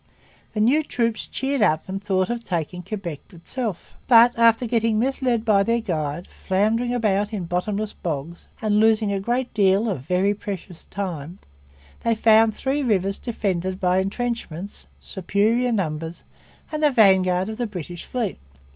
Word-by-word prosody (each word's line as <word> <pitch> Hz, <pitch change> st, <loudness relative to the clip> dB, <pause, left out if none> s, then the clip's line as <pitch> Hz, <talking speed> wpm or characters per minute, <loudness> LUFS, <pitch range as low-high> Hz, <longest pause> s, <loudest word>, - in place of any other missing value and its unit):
The 215 Hz, -, -3 dB
new 255 Hz, +9 st, +4 dB
troops 230 Hz, -6 st, -1 dB
cheered 270 Hz, -1 st, -2 dB
up 160 Hz, -6 st, +2 dB
and 195 Hz, +1 st, -4 dB
thought 190 Hz, 0 st, 0 dB
of 240 Hz, -1 st, -4 dB
taking 180 Hz, -2 st, -3 dB
Quebec 180 Hz, -5 st, -5 dB
itself. 200 Hz, +3 st, -5 dB
But, 240 Hz, 0 st, +7 dB
after 230 Hz, +1 st, +4 dB
getting 225 Hz, -1 st, +1 dB
misled 250 Hz, -1 st, 0 dB
by 205 Hz, -3 st, +4 dB
their 230 Hz, +3 st, +1 dB
guide, 165 Hz, -5 st, -3 dB
floundering 220 Hz, +6 st, 0 dB
about 210 Hz, -3 st, +1 dB
in 200 Hz, -5 st, -3 dB
bottomless 200 Hz, +5 st, -2 dB
bogs, 165 Hz, +1 st, -5 dB, 0.2 s
and 210 Hz, -1 st, +2 dB
losing 220 Hz, -1 st, +3 dB
a 200 Hz, -, -1 dB
great 240 Hz, +5 st, -2 dB
deal 200 Hz, +1 st, +3 dB
of 190 Hz, -, -2 dB
very 180 Hz, +7 st, +1 dB
precious 195 Hz, -4 st, -7 dB
time, 175 Hz, -4 st, -5 dB, 0.6 s
they 230 Hz, -1 st, +1 dB
found 220 Hz, 0 st, +4 dB
Three 275 Hz, +5 st, -1 dB
Rivers 195 Hz, -6 st, 0 dB
defended 190 Hz, -5 st, -2 dB
by 180 Hz, 0 st, +2 dB
entrenchments, 200 Hz, -3 st, -4 dB
superior 215 Hz, +6 st, 0 dB
numbers, 165 Hz, -5 st, -3 dB, 0.5 s
and 305 Hz, 0 st, -3 dB
the 300 Hz, -, +5 dB
vanguard 190 Hz, -6 st, +4 dB
of 220 Hz, 0 st, -5 dB
the 240 Hz, -, -1 dB
British 175 Hz, -3 st, -7 dB
fleet. 235 Hz, -6 st, -3 dB
205 Hz, 155 wpm, -23 LUFS, 185-230 Hz, 0.6 s, But